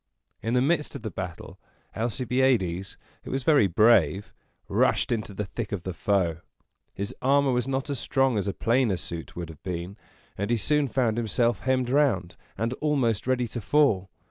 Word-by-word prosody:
In 115 Hz, +3 st, -1 dB
the 125 Hz, -, +3 dB
midst 150 Hz, 0 st, 0 dB
of 135 Hz, -, -7 dB
the 110 Hz, -, -4 dB
battle, 90 Hz, -1 st, -7 dB, 0.4 s
Alcibiades, 115 Hz, -5 st, 0 dB, 0.3 s
who -, -, -9 dB
was 135 Hz, 0 st, -2 dB
very 140 Hz, -8 st, +5 dB
brave, 95 Hz, -2 st, +3 dB, 0.3 s
rushed -, -, +2 dB
into 110 Hz, -3 st, -2 dB
the 100 Hz, +1 st, -4 dB
thick 110 Hz, +2 st, -5 dB
of 95 Hz, -4 st, -3 dB
the 95 Hz, -, -4 dB
foe. 85 Hz, -1 st, 0 dB, 0.6 s
His 100 Hz, +5 st, -4 dB
armor 140 Hz, +1 st, +3 dB
was 125 Hz, 0 st, 0 dB
not 135 Hz, 0 st, -1 dB
as 140 Hz, -4 st, -3 dB
strong 135 Hz, -2 st, +1 dB
as 100 Hz, -1 st, -1 dB
a 100 Hz, -, -1 dB
plainer 115 Hz, -4 st, +2 dB
suit 85 Hz, -1 st, -7 dB
would 85 Hz, -2 st, -5 dB
have 80 Hz, -3 st, -12 dB
been; 90 Hz, +2 st, -5 dB, 0.4 s
and 100 Hz, +2 st, -1 dB
he 120 Hz, -, +2 dB
soon 150 Hz, +6 st, +1 dB
found 120 Hz, -3 st, 0 dB
himself 115 Hz, 0 st, +1 dB
hemmed 130 Hz, -1 st, 0 dB
round, 120 Hz, -12 st, +2 dB, 0.2 s
and 115 Hz, +4 st, -1 dB
almost 130 Hz, -8 st, +1 dB
ready 125 Hz, -2 st, +1 dB
to 120 Hz, -, -5 dB
fall. 105 Hz, -8 st, +2 dB
115 Hz, 180 wpm, -26 LUFS, 95-130 Hz, 0.6 s, very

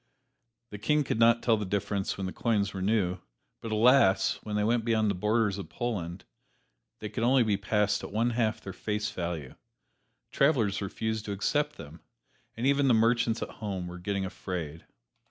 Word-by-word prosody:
The 105 Hz, -, -7 dB
King 150 Hz, +7 st, +2 dB
could 120 Hz, -, -2 dB
not 115 Hz, 0 st, +5 dB
tell 115 Hz, -2 st, +3 dB
the 105 Hz, -, -3 dB
difference 100 Hz, 0 st, -2 dB
when 95 Hz, -, -3 dB
the 95 Hz, -, -4 dB
coins 105 Hz, -4 st, 0 dB
were 95 Hz, -, -5 dB
new, 95 Hz, -3 st, +1 dB, 0.4 s
but 115 Hz, -, -6 dB
alas! 110 Hz, -4 st, +4 dB
when 105 Hz, -1 st, -5 dB
they 105 Hz, -, +1 dB
went 115 Hz, +2 st, +1 dB
beyond 110 Hz, -2 st, +2 dB
the -, -, -1 dB
borders 105 Hz, +1 st, +1 dB
of 100 Hz, -, -7 dB
Poland 90 Hz, -7 st, -4 dB, 0.7 s
they 105 Hz, -, -6 dB
could 110 Hz, -, -4 dB
only 125 Hz, +1 st, +4 dB
be 105 Hz, -3 st, +1 dB
passed 105 Hz, +1 st, 0 dB
at -, -, -7 dB
one 115 Hz, +4 st, +1 dB
half 115 Hz, -1 st, 0 dB
their 95 Hz, -, -7 dB
face 105 Hz, +2 st, -3 dB
value; 85 Hz, -6 st, -4 dB, 0.8 s
travelers 110 Hz, -10 st, +2 dB
refused 110 Hz, +2 st, -3 dB
to 100 Hz, -, -3 dB
accept 150 Hz, +9 st, 0 dB
them; 80 Hz, +2 st, -11 dB, 0.6 s
and 120 Hz, -, -2 dB
even 140 Hz, 0 st, +3 dB
the 125 Hz, -, +5 dB
merchants 115 Hz, 0 st, +2 dB
at -, -, -6 dB
home 95 Hz, -4 st, -3 dB
were 90 Hz, 0 st, -8 dB
getting 100 Hz, +1 st, -2 dB
afraid. 85 Hz, -4 st, -6 dB
105 Hz, 185 wpm, -29 LUFS, 95-115 Hz, 0.8 s, not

